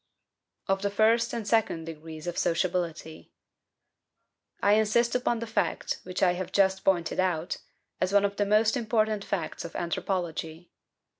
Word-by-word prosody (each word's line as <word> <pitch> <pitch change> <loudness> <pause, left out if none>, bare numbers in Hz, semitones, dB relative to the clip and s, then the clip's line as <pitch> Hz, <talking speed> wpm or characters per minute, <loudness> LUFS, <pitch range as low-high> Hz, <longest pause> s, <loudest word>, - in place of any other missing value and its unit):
% - - -48
2. - - +5
Of 195 - -3
the 200 - 0
first 225 +3 +3
and 225 -3 -4
second 210 -8 +1
degrees 160 -1 -8
of 175 -1 -3
Sociability. 170 -2 -2 1.3
I 205 - +4
insist 220 +3 +3
upon 245 -1 +1
the 230 - -4
fact, 225 - -1
which 185 +1 -3
I 180 -1 +5
have 185 0 -5
just 190 -1 +2
pointed 175 -3 +1
out, 175 -3 0 0.4
as 185 - +1
one 200 0 +4
of 200 0 -2
the 205 - +2
most 215 +3 +3
important 215 -3 0
facts 180 -7 -3
of 170 - -8
anthropology. 170 -2 -3
195 Hz, 160 wpm, -28 LUFS, 170-215 Hz, 1.3 s, 2